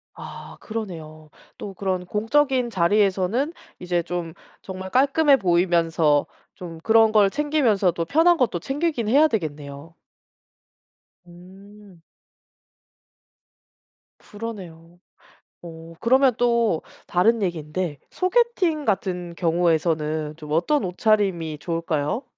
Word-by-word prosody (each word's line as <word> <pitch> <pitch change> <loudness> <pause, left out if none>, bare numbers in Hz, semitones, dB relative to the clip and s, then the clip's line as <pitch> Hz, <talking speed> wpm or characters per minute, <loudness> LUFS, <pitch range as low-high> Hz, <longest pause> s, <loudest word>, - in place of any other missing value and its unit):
아 - - -10
그러네요. 160 -8 -7 0.3
또 200 - -7
그런 185 -1 -3
공적인 250 +5 +1
자리에서는 205 - +1 0.3
이제 175 -1 -1
좀 175 -2 -5 0.3
정말 190 0 -7
깔끔해 280 +3 +4
보이면서 170 - +2 0.3
좀 165 -3 -9
그런 225 0 +4
걸 210 -2 +4
챙기면서도 225 - +1
편한 330 - +3
것도 235 - 0
챙기기는 270 - -2
해야 300 +4 +6
되겠네요. 150 - -5 1.3
음. 190 +1 -16 2.2
그러네요. 175 -6 -10 0.6
어 165 -1 -11
그러면 260 +1 +4
또 235 -7 +1 0.3
다른 220 +5 +2
얘긴데 165 -3 -3
소개팅 370 -6 0
같은 180 -4 -2
경우에서는 160 -3 0
좀 150 -1 -10
어떤 225 - +1
옷차림이 180 -5 0
좋을까요? 165 - -2
185 Hz, 235 characters per minute, -23 LUFS, 165-230 Hz, 2.2 s, 해야